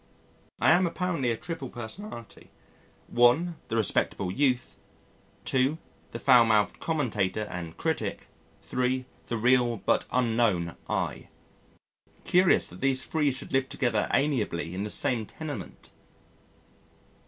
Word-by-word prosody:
I - - +5
am 175 +2 +4
apparently 170 -7 -1
a 115 - 0
triple 165 -4 -6
personality: 120 - -8 0.6
(1) 125 +9 +4
The 115 - -3
respectable 100 -3 0
youth. 125 +1 0 0.7
(2) 135 +4 +2 0.3
The - - -6
foul 125 0 +6
mouthed 110 -2 +2
commentator 110 - -1
and 90 -5 -7
critic. - - -2 0.4
(3) 125 0 -1 0.2
The 115 - -2
real 120 0 +3
but 95 - +1
unknown 115 -8 +1
I. - - -2 1.0
Curious 180 0 +4
that 90 - -12
these 130 -1 +1
three 150 -3 +1
should 130 - -6
live 135 0 +1
together 115 -5 0
amiably 110 - 0
in 95 - -3
the 105 - -3
same 115 0 0
tenement! 105 - -8
125 Hz, 120 wpm, -28 LUFS, 110-140 Hz, 1.0 s, foul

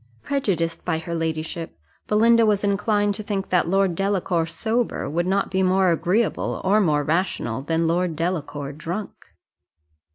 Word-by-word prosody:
Prejudiced 185 -12 -1
by 165 -3 0
her 165 +1 -5
ladyship, 160 - -3 0.3
Belinda 230 +2 +4
was 210 -2 +2
inclined 205 0 +1
to 210 - -4
think 200 -2 -3
that 180 -2 +2
Lord 195 0 +2
Delacour 185 -3 0
sober 220 +8 -1
would 170 +5 -1
not 195 +1 0
be 190 0 +1
more 185 0 +3
agreeable 190 +7 0
or 205 +3 +3
more 150 -6 +2
rational 155 -7 -1
than 165 +3 0
Lord 170 0 0
Delacour 150 -4 -3
drunk. 170 +8 -5
180 Hz, 150 wpm, -23 LUFS, 165-205 Hz, 0.3 s, Belinda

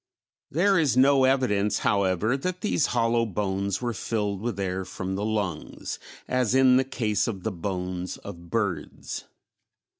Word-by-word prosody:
There 190 +4 +3
is 140 -6 +2
no 135 0 +6
evidence, 125 -6 +2
however, 100 +3 +2
that 180 +6 -3
these 205 -8 +2
hollow 115 -1 +2
bones 100 0 -1
were 120 -1 0
filled 105 -4 -2
with 115 -3 -3
air 95 -1 -1
from 95 +1 -5
the 100 +2 -2
lungs, 105 -7 -3 0.3
as 125 -1 +1
in 130 -1 +6
the 130 - +4
case 110 -6 0
of 100 -6 -4
the 110 - -1
bones 90 0 -4
of 85 0 -10
birds. 100 -8 -3
105 Hz, 150 wpm, -26 LUFS, 95-130 Hz, 0.3 s, no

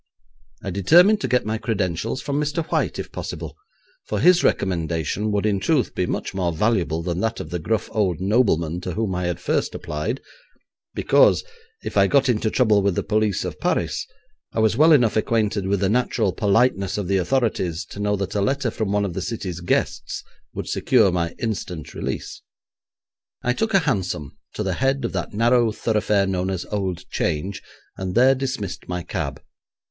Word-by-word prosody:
I 95 - -3
determined 175 - +5
to - - -1
get 125 - +1
my 110 +1 -2
credentials 105 +2 -2
from 145 0 -1
Mr. 150 +2 -1
White - - 0
if - - -6
possible, - - -6 0.5
for - - -2
his 180 -1 +5
recommendation 90 +2 0
would 105 0 0
in 100 -2 +1
truth 145 +4 +1
be 90 - -1
much - - -3
more 90 -3 0
valuable 85 -3 0
than 85 0 -2
that 115 +2 -1
of - - -7
the 90 - -2
gruff 110 +6 -1
old 95 -7 0
nobleman 95 -5 +1
to 90 - -4
whom 110 -2 -1
I 90 0 -2
had 85 -1 -2
first - - -1
applied, 75 - -3 0.8
because, - - +4 0.4
if - - -4
I - - +6
got 140 -2 +3
into 110 -2 +1
trouble 110 -4 +3
with 100 -2 +1
the - - -1
police 105 -4 0
of - - -5
Paris, - - -1 0.5
I - - -1
was 110 0 +3
well 155 +5 +6
enough 120 -8 +4
acquainted 105 -3 0
with 100 0 0
the 95 - +3
natural 115 -3 +1
politeness 100 -1 +2
of 100 -3 -2
the 100 +1 +2
authorities 95 -4 0
to - - -8
know 105 0 +1
that 100 -2 -3
a 100 - 0
letter 130 +3 0
from 110 -3 -2
one 105 0 +1
of 95 - -4
the - - -3
city's 95 -7 -4
guests 85 - -1 0.3
would - - -4
secure 110 -7 +3
my 85 -1 -1
instant 90 -8 -4
release. - - -5 1.0
I 125 - +2
took 220 - -1
a - - +7
hansom 85 -8 -2 0.2
to 105 - -2
the 95 -2 -1
head 135 +4 0
of - - -3
that - - -3
narrow 120 +1 +3
thoroughfare 105 -2 +1
known 95 -1 -1
as 95 -2 -3
Old 95 -4 -3
Change, 95 +6 -2 0.4
and 95 -1 -4
there 130 +2 +6
dismissed 130 -8 -4
my 90 -1 -3
cab. 80 -6 -4
105 Hz, 185 wpm, -23 LUFS, 90-115 Hz, 1.0 s, a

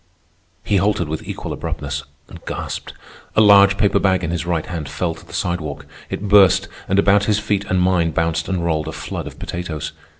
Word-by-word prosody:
He 100 - +1
halted 100 -2 +1
with 80 +1 -3
equal - - -5
abruptness, 70 0 -4 0.2
and - - -13
gasped. - - -5 0.4
A - - +4
large 100 -1 +7
paper 100 - +3
bag 95 -2 +2
in 85 - -2
his 85 0 -3
right 85 -3 0
hand 80 -5 -5
fell 85 -2 -2
to 80 - -14
the - - -16
sidewalk. 75 -5 -3 0.2
It 105 - -4
burst, 100 -2 +5 0.2
and 95 - +1
about 100 0 +4
his 105 -1 +2
feet 100 -1 -1
and 95 -1 0
mine 90 -2 +2
bounced 80 +1 -1
and 90 -3 -1
rolled 80 -2 0
a - - -4
flood - - -5
of - - -10
potatoes. 85 -3 -5
90 Hz, 200 wpm, -20 LUFS, 80-100 Hz, 0.4 s, large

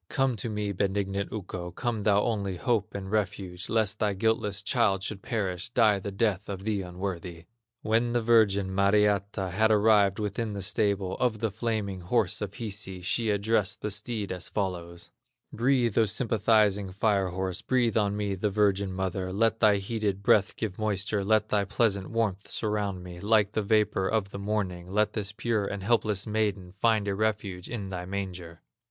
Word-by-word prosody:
Come 135 -3 +1
to 115 - -3
me, 105 -1 -2
benignant 100 0 -1
Ukko, 90 -4 -5
Come, 115 +4 -3
thou 100 0 +3
only 100 -5 -1
hope 110 +1 0
and 95 -1 -5
refuge, 95 -4 -2
Lest 110 -2 +1
thy 105 -1 +1
guiltless 105 -1 0
child 105 -5 +2
should 100 -1 -4
perish, 95 -5 -2
Die 110 -4 +3
the 100 +1 -5
death 105 -1 0
of 95 -1 -5
the 105 -2 -1
unworthy!" 90 -2 -6 0.4
When 115 +2 +1
the 120 - +2
virgin, 100 -4 +3
Mariatta, 100 -1 +2
Had 110 +5 +3
arrived 105 -2 +4
within 105 +1 -2
the 100 -1 -5
stable 100 -2 0
Of 120 -3 +1
the 110 0 -1
flaming 105 -3 -2
horse 105 +2 0
of 100 -1 -4
Hisi, 100 -4 -6
She 115 +4 0
addressed 105 -1 +1
the 105 - -2
steed 105 0 -3
as 90 -2 -5
follows: 85 -4 -4 0.4
"Breathe, 120 -2 +2
O 115 - +5
sympathizing 105 -2 +2
fire 100 0 +1
horse, 95 0 -2
Breathe 120 -4 +1
on 105 -2 +1
me, 100 -1 -1
the 95 +2 -1
virgin 100 -1 +1
mother, 95 0 -2
Let 115 +3 +1
thy 105 -3 +5
heated 100 -1 -2
breath 100 0 +3
give 105 -4 -4
moisture, 100 -1 -1
Let 110 +1 +2
thy 105 -1 +2
pleasant 100 -1 0
warmth 105 -4 -1
surround 105 -4 -2
me, 90 -1 -9
Like 105 0 +3
the 110 - 0
vapor 105 -2 +2
of 100 -2 0
the 100 - -6
morning; 95 -4 -3
Let 105 +1 +1
this 100 -3 -3
pure 110 -1 -1
and 100 -1 -5
helpless 105 -2 +1
maiden 105 -4 -1
Find 105 +1 +1
a 100 - 0
refuge 100 -3 -2
in 105 -5 -4
thy 90 -1 -5
manger!" 90 -4 -6
100 Hz, 175 wpm, -28 LUFS, 95-110 Hz, 0.4 s, O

